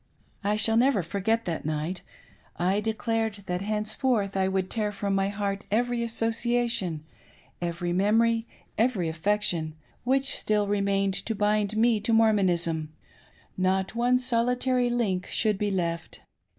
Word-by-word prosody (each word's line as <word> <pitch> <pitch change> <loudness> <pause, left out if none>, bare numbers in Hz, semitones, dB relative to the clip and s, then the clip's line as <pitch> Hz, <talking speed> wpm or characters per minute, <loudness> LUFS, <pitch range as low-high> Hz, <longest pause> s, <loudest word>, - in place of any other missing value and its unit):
j 200 - -1
I 210 - +2
shall 225 +1 +2
never 245 -5 +3
forget 205 +6 -1
that 165 -3 -3
night. 155 +4 -3 0.6
I 185 +3 +1
declared 220 -1 -2
that 180 0 -2
henceforth 215 0 0
t 190 -1 +1
would 190 -1 0
tear 215 -2 0
from 200 -1 -2
my 195 0 +1
heart 200 0 -3
every 240 +3 +1
association 230 -6 0 0.3
— - - -31
every 175 0 -2
mem 205 +5 +3
ory— 230 0 +2 0.3
every 220 -8 +1
affection, 165 -2 -1 0.3
which 265 +2 +1
still 210 -1 +1
remained 200 -1 +1
to 225 +3 -3
bind 210 0 +1
me 230 -1 +4
to 225 +2 0
Mor 225 -1 +5
monism 170 -5 +1 0.4
— - - -29 0.3
not 185 +1 +1
one 245 +2 +3
solitary 250 0 +1
link 205 -7 0
should 215 -3 0
be 210 - 0
left. 170 -3 -3
210 Hz, 150 wpm, -27 LUFS, 190-230 Hz, 0.6 s, Mor